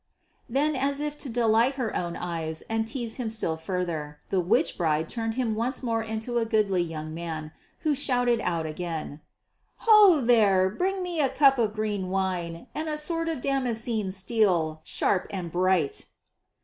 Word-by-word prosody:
Then 290 +5 +1
as 275 +2 0
if 295 0 -3
to 280 - -3
delight 230 +2 +3
her 250 -5 -2
own 170 -1 -2
eyes 160 -2 -3
and 225 0 -2
tease 235 -2 -3
him 245 -4 -2
still 220 -7 0
further, 160 -3 -4
the 190 - +2
witch 225 - +2
bride 160 -2 0
turned 225 +1 -3
him 245 -4 0
once 245 +5 -2
more 230 -2 0
into 220 +2 -2
a 230 - 0
goodly 210 -5 +2
young 155 -2 -5
man 160 -2 -5 0.3
who 305 - +2
shouted 245 -4 +1
out 165 -2 -1
again: 160 -2 -5 0.6
"Ho, 420 -7 +8
there, 205 -7 +4
bring 375 - -1
me 345 -3 -1
a 275 - +2
cup 270 -2 +4
of 215 -2 +1
green 210 -3 -2
wine 185 -2 -2
and 310 +1 -3
a 305 - -2
sword 330 +2 -1
of 315 -6 -3
damascened 235 -7 -1
steel, 185 -7 +1
sharp 190 - 0
and 180 -4 -5
bright." 180 -4 +1
220 Hz, 170 wpm, -27 LUFS, 175-255 Hz, 0.6 s, Ho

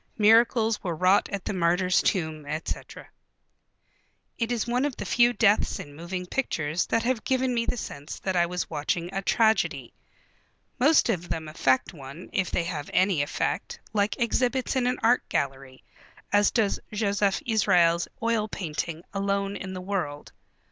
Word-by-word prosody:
Miracles 225 0 +4
were 175 -4 -2
wrought 185 +5 +3
at 200 -2 -5
the - - -2
martyr's 180 +1 +2
tomb, 160 -4 -1
etc...." 155 +2 -5 1.3
It 230 0 -2
is 235 -3 0
one 245 +2 0
of 285 -3 -1
the - - -5
few 240 0 +4
deaths 215 -4 +2
in 145 - -9
moving 180 +3 -5
pictures 170 - -1
that 230 - +1
have 245 -1 0
given 260 -1 +1
me 230 -1 -1
the - - -1
sense 145 -7 -7
that 190 -1 -2
I 175 -1 +3
was 180 0 -3
watching 165 +3 -3
a 195 - -1
tragedy. 220 +2 +1 0.9
Most 290 0 +4
of 175 -6 -1
them 160 -1 -3
affect 130 -4 +1
one, 140 +3 -10
if 190 -2 0
they 170 - 0
have 160 -4 -5
any 185 -5 +2
effect, 145 - -2
like 205 -1 +1
exhibits 250 +3 0
in 250 -2 +1
an 250 - 0
art 240 +2 +4
gallery, 135 -1 -3 0.5
as 205 0 +5
does 220 -4 +1
Josef 205 -2 +1
Israels' 180 -7 +3 0.2
oil 230 -2 +1
painting, 165 -3 -4
Alone 200 0 -1
in 190 -1 -6
the 185 - -5
World. 180 -7 -4
195 Hz, 160 wpm, -26 LUFS, 170-225 Hz, 1.3 s, as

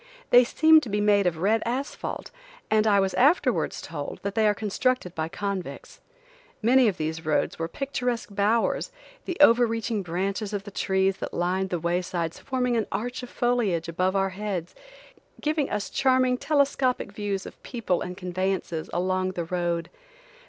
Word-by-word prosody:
They 245 +1 +8
seemed 315 +5 +5
to 250 - -6
be 205 +1 0
made 205 -2 +3
of 170 -2 -1
red 210 +6 +2
asphalt, 260 - -4 0.4
and 215 0 +3
I 200 -2 +5
was 195 -1 +1
afterwards 280 -2 +2
told 145 -3 -6
that 200 0 -2
they 220 0 +3
are 210 - +3
constructed 215 -1 -1
by 160 -2 -2
convicts. 200 -1 -5 0.6
Many 250 +2 +5
of 200 - 0
these 160 +1 -3
roads 155 0 0
were 165 - -1
picturesque 245 +1 -3
bowers, 220 - +1 0.3
the 360 - -4
over 240 -4 +6
reaching 225 -1 -2
branches 195 +4 -3
of 200 -1 -2
the 205 - -9
trees 190 0 +1
that - - -6
lined 185 +2 0
the 180 - -1
waysides 170 0 -2
forming 250 -2 -1
an 225 -2 0
arch 245 +6 -3
of 250 - -8
foliage 225 -10 0
above 185 +3 0
our 195 0 +2
heads, 185 -3 -4 0.7
giving 305 -2 0
us 210 0 -2
charming 255 -1 +3
telescopic 270 -5 +1
views 200 -2 -3
of - - -11
people 225 -8 -2
and 180 0 -5
conveyances 185 -3 -2
along 185 +1 0
the 170 -2 -3
road. 170 -1 -2
200 Hz, 165 wpm, -26 LUFS, 180-245 Hz, 0.7 s, They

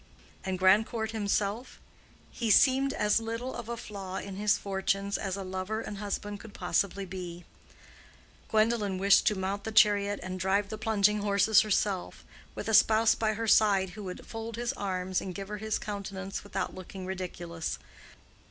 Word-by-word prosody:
And 190 -1 -2
Grandcourt 215 +4 +3
himself? 210 +2 -2 0.5
He 230 -2 -2
seemed 270 +5 +5
as 210 -2 +2
little 230 +3 -4
of 235 -1 -7
a 235 - -3
flaw 195 -4 -7
in 195 0 -5
his 205 +1 +2
fortunes 195 0 -1
as 195 -1 -2
a 195 - -4
lover 190 +3 -3
and 210 -3 -6
husband 205 0 -4
could 220 -1 -12
possibly 195 +2 0
be. 180 -2 -7 1.0
Gwendolen 215 -3 +2
wished 195 +1 +5
to 210 - +3
mount 195 +2 -2
the 220 - -4
chariot 205 -1 +4
and 185 0 -5
drive 195 +2 +1
the 215 - -5
plunging 210 -1 +2
horses 205 +1 +4
herself, 205 -3 -1 0.3
with - - -5
a 220 - 0
spouse 220 +1 +6
by 220 -1 0
her 225 +1 -3
side 200 -4 +4
who 210 +2 -9
would 180 -1 -7
fold 225 0 -6
his 240 +1 -2
arms 185 -2 -2
and 185 -2 -6
give 195 0 -6
her 210 - -4
his 220 0 -1
countenance 195 -2 -5
without 205 - -3
looking 185 0 -8
ridiculous. 175 -3 -4
200 Hz, 170 wpm, -29 LUFS, 190-220 Hz, 1.0 s, spouse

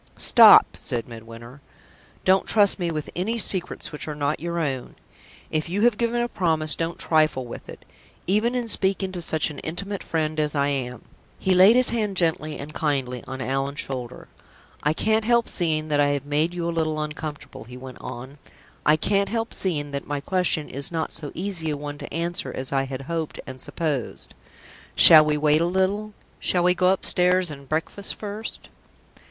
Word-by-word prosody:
"Stop!" - - +7
said 120 -1 -3
Midwinter. 115 +3 -12 0.6
"Don't 190 +1 +3
trust 205 -2 +4
me 175 -1 -1
with 155 -2 -5
any 215 +7 -2
secrets 185 -5 -3
which 150 - -7
are 150 - -4
not 145 +1 -1
your 170 +1 -4
own. 135 -6 -3 0.6
If 155 +1 -2
you 195 +4 -1
have 240 -2 +4
given 235 0 0
a - - -1
promise, 160 -8 +1
don't 165 0 -3
trifle 155 -5 +1
with 120 - -10
it, - - -11 0.4
even 215 +6 +1
in 245 -2 -2
speaking 195 -2 0
to 180 -2 -6
such 160 -1 -1
an 145 - -9
intimate 195 +5 -5
friend 155 -1 -2
as 150 0 -1
I 140 0 +1
am." 125 -3 -4 0.3
He 190 - +1
laid 190 +5 +7
his 255 0 +6
hand 210 -5 -2
gently 160 -3 0
and 150 +2 -8
kindly 135 -6 -2
on 130 0 -6
Allan's 135 +2 -2
shoulder. 125 -2 -6 0.5
"I 150 - +1
can't 220 +6 +1
help 235 0 +2
seeing 155 -3 0
that 145 -1 +1
I 145 - +4
have 145 -1 -2
made 150 +3 0
you 175 -1 -4
a 170 - -2
little 155 -2 -1
uncomfortable," 150 -4 -7
he 125 +2 -11
went 130 -1 -11
on. 130 +4 -9 0.4
"I 150 - +4
can't 200 +5 0
help 225 0 -3
seeing 150 -6 -2
that 140 0 -5
my 145 -1 -2
question 170 -1 +1
is 140 +4 -2
not 160 -1 -3
so 150 -2 -5
easy 175 -3 -3
a 150 - -2
one 145 0 -7
to - - -9
answer 170 -5 -2
as 130 +1 -4
I 135 -1 0
had 135 0 -6
hoped 165 +1 -4
and 130 -1 -9
supposed. 150 -8 -4 0.6
Shall 155 -2 +10
we 150 0 0
wait 150 +1 +2
a - - +2
little? 200 +4 -1 0.2
Shall 175 -1 +2
we 180 0 +4
go 185 0 +2
upstairs 180 -2 +3
and 140 -2 -11
breakfast 165 +6 -1
first?" 210 +1 -7
155 Hz, 190 wpm, -23 LUFS, 145-185 Hz, 0.6 s, Shall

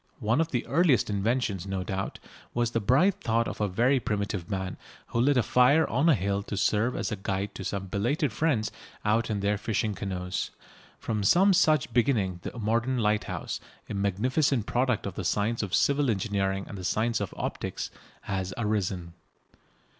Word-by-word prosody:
One 110 +8 +1
of 165 - 0
the 120 -5 -1
earliest 145 -8 +3
inventions, 100 -2 0
no 95 -1 -2
doubt, 95 +1 -3 0.4
was 120 -1 +1
the 115 - +1
bright 165 - +3
thought 115 0 +1
of - - -5
a 105 - +2
very 120 +8 +2
primitive 100 -5 -2
man 95 -2 -3 0.3
who 115 - 0
lit 140 +2 +3
a 125 - +4
fire 130 +8 +4
on 140 +8 +2
a 155 - +6
hill 100 0 -1
to 100 0 -5
serve 110 +4 +2
as - - -2
a - - 0
guide 100 +1 -3
to - - -7
some 95 +1 -3
belated 120 - 0
friends 130 -9 +1 0.3
out 115 +2 +2
in 105 -2 -1
their 100 +1 +1
fishing 110 0 -1
canoes. 90 -1 -3 0.5
From 105 -2 -2
some 190 - +5
such 155 -6 +3
beginning 110 -8 +1
the - - -7
modern 115 +4 0
lighthouse, 105 -2 -1 0.3
a - - -5
magnificent 110 - +1
product 125 0 0
of 100 - -3
the 95 - -5
science 105 +5 0
of 100 -4 -1
civil 140 -1 +2
engineering 95 -2 0
and 100 - -7
the - - -7
science 110 +5 0
of 100 - -3
optics, - - -4 0.3
has 95 -1 -3
arisen. 100 -6 -1
110 Hz, 180 wpm, -28 LUFS, 100-125 Hz, 0.5 s, a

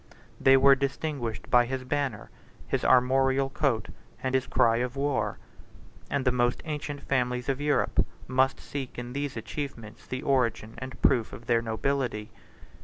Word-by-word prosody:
They 135 0 +6
were 135 +1 +7
distinguished 140 -3 -3
by 120 -1 +5
his 130 0 -3
banner, 130 -4 -2 0.4
his - - -1
armorial 135 +1 +3
coat, 120 -9 0 0.3
and 130 0 -1
his 130 -1 +1
cry 115 -1 +3
of 125 +1 -2
war; 135 -7 -1 0.7
and 140 -1 -1
the 130 - +4
most 120 0 +1
ancient 150 -2 -4
families 125 -2 0
of 135 +1 -1
Europe 145 0 +2 0.2
must 130 +1 +2
seek 135 -3 -6
in 120 0 -6
these 140 -2 -3
achievements 115 -3 -6
the 130 0 -4
origin 120 -5 +1
and 130 +1 -8
proof 120 -5 +3
of 120 - -9
their 115 -1 +2
nobility. 115 -1 -2
130 Hz, 155 wpm, -28 LUFS, 120-140 Hz, 0.7 s, were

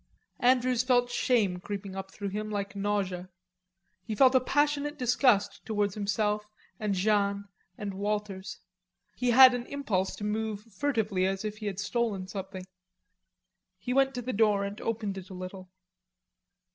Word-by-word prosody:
Andrews 250 -1 +3
felt 245 -1 +2
shame 220 -7 +1
creeping 200 0 -6
up 195 0 -5
through 200 -1 -5
him 210 +2 -4
like 200 -1 -3
nausea. 195 -3 -2 0.7
He 215 - -4
felt 260 +4 +6
a 260 - +6
passionate 290 +2 0
disgust 245 -4 +2
towards 205 -3 0
himself 210 0 -1 0.3
and 210 -2 0
Jeanne 200 0 +1 0.3
and 205 -2 -4
Walters. 205 -1 -3 0.6
He 250 - 0
had 255 +1 +9
an 245 0 -3
impulse 205 -10 -1
to - - -8
move 210 0 -2
furtively 210 -5 0
as 195 +2 -2
if 215 0 -4
he 210 - -4
had 195 -2 -3
stolen 210 -2 -1
something. 190 -1 -6 1.1
He 250 - -3
went 270 0 +3
to 245 - -4
the 255 - -3
door 210 -2 +3
and 200 +1 -5
opened 210 -4 -2
it 185 - -12
a 190 - -8
little. 185 0 -8
210 Hz, 155 wpm, -29 LUFS, 195-245 Hz, 1.1 s, had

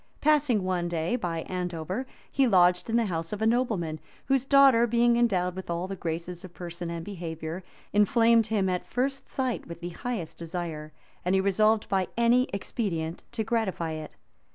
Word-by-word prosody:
Passing 285 -8 +3
one 180 -2 0
day 170 +5 -1
by 170 -8 -2
Andover, 180 +6 -3 0.2
he 270 -1 +3
lodged 180 -2 +4
in 225 - 0
the 235 -1 +3
house 165 -4 -3
of 210 - -3
a 220 - +1
nobleman, 220 -10 0 0.3
whose 270 -1 +2
daughter, 270 -4 +6
being 235 +1 +3
endowed 185 -7 +1
with 190 -1 -7
all 170 +1 -1
the 195 - -4
graces 170 +1 -4
of 185 -2 -11
person 175 -1 -6
and 170 -1 -5
behavior, 165 -2 -5 0.3
inflamed 225 +2 +4
him 205 -3 +1
at 180 -1 -2
first 270 +2 -2
sight 260 -3 -2
with 170 0 -8
the 175 0 -5
highest 190 -2 -5
desire; 165 -3 -5 0.3
and 180 +2 +2
he - - +4
resolved 215 +3 +3
by 190 -2 +1
any 235 +2 +4
expedient 180 -5 -3
to 220 - -1
gratify 215 -7 -1
it. 155 -1 -7
190 Hz, 175 wpm, -27 LUFS, 170-235 Hz, 0.3 s, daughter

